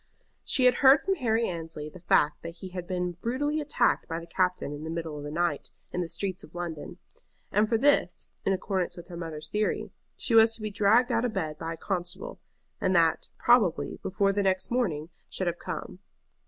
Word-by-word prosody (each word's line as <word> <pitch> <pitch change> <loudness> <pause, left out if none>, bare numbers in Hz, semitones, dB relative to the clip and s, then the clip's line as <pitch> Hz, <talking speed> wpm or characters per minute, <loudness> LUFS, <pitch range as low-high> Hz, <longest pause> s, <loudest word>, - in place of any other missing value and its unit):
She 255 - +2
had 250 - +7
heard 270 +1 +8
from 390 - +1
Harry 230 -8 +1
Annesley 165 -3 -5
the 165 +4 -11
fact 150 -3 +2
that 165 0 -7
he 185 +2 -8
had 180 -1 -6
been 180 -2 -2
brutally 290 +6 0
attacked 295 - +1
by 165 0 -3
the 170 - -9
captain 180 -3 0
in 145 +1 -7
the 160 - -5
middle 165 -2 -4
of 145 - -6
the 145 - -5
night 155 -2 -1 0.2
in 180 - -2
the 170 - -3
streets 190 0 -3
of 155 - -15
London; 170 -4 -5 0.5
and 210 +1 +3
for 230 - +3
this, 285 +5 +2 0.2
in - - +1
accordance 190 -1 -1
with 175 - -10
her 175 - -7
mother's 155 -2 -6
theory, 210 0 -1 0.3
she 235 - -2
was 225 0 +7
to - - -9
be 215 - -2
dragged 220 +5 +4
out 230 0 +2
of 245 -3 -1
bed 160 -7 -3
by 165 0 -3
a - - -9
constable, 185 - -3 0.4
and 185 - +2
that, 165 -1 +3
probably, 220 -9 +3
before 195 +1 +1
the 205 - +1
next 190 0 0
morning 170 -11 0 0.2
should 185 - -2
have 175 0 -1
come. 180 0 -6
185 Hz, 210 wpm, -28 LUFS, 165-225 Hz, 0.5 s, heard